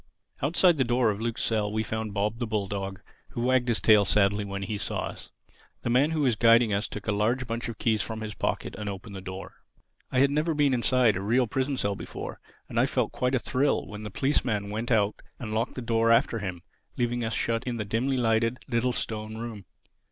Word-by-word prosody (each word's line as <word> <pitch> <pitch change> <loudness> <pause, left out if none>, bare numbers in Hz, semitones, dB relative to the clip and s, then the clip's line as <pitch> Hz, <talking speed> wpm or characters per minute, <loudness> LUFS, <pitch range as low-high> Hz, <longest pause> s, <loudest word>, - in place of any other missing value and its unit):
Outside 170 +4 +4
the 135 - +3
door 120 -2 +2
of 100 +1 -5
Luke's 115 0 -2
cell 105 -2 0
we 110 +1 0
found 110 0 -3
Bob, 105 +3 -1
the 120 - -1
bulldog, 100 -2 -3 0.3
who 120 - -3
wagged 125 0 +2
his 120 -2 +2
tail 105 -2 +6
sadly 100 0 +3
when 100 -1 -4
he 105 0 -3
saw - - -1
us. - - -7 0.5
The 120 - 0
man 135 +5 +4
who 160 -1 -1
was 130 -5 +3
guiding 115 0 +5
us 100 +2 0
took 105 - -7
a 105 - +1
large 115 +5 +1
bunch 115 0 -3
of 115 - -6
keys 110 -3 +1
from 110 +1 -5
his 105 -1 -5
pocket - - -2
and 105 -1 -3
opened 100 +1 -7
the 95 - -6
door. 95 +1 -8 0.5
I - - -1
had 140 +2 +5
never 155 +2 +1
been 145 -2 +3
inside 125 -3 +3
a 95 - -2
real 120 +6 +2
prison 135 +4 -1
cell 100 -3 0
before; - - -7 0.3
and - - -1
I - - +4
felt - - 0
quite 125 +1 0
a - - +4
thrill 135 +3 +1
when 105 0 -8
the 105 - -5
policeman 105 -4 0
went 110 +3 -3
out 105 -3 +2 0.2
and 110 -5 -5
locked 110 +1 -1
the 125 - -5
door 115 0 +2
after 115 0 +3
him, 90 -4 -5 0.3
leaving 120 0 0
us 110 0 -2
shut 115 0 0
in 125 -2 -2
the 105 - -3
dimly 125 +6 0
lighted, 115 0 +2
little, 125 0 +1
stone 110 -1 -4
room. 110 -4 -6
115 Hz, 225 wpm, -27 LUFS, 105-125 Hz, 0.5 s, tail